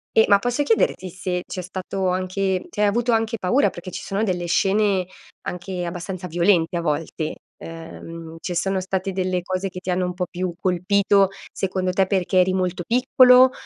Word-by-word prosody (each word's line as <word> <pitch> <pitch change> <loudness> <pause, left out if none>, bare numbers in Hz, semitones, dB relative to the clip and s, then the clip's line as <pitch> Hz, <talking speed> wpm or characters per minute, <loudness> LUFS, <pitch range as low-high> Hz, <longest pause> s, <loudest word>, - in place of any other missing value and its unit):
E 220 - +7
ma 200 -1 +6
posso 245 +6 -1
chiederti 200 -6 +1
se 180 0 -3
c'è 185 - -5
stato 185 +1 -3
anche 185 +1 -1
cioè 210 - -4
hai 205 - +5
avuto 235 +3 +1
anche 225 0 0
paura, 240 +10 +2
perché 175 +1 -9
ci - - -6
sono 200 +3 -1
delle 180 -4 -1
scene 195 +1 +2 0.4
anche 180 0 -4
abbastanza 180 +1 -5
violente 170 0 +2
a 170 - 0
volte. 155 0 -2 0.3
Uhm, 165 0 -9
ci 180 - -3
sono 190 +2 0
state 190 0 -2
delle 185 -1 -1
cose 185 +1 -2
che 180 - -8
ti 185 - -7
hanno 180 0 +1
un 180 - -3
po' 180 0 -1
più 180 0 -3
colpito 195 +2 +3 0.2
secondo 185 -1 -1
te 190 0 +2
perché 185 -1 +1
eri 185 +1 +4
molto 180 -2 -1
piccolo, 250 +1 +6
185 Hz, 185 wpm, -22 LUFS, 180-200 Hz, 0.4 s, E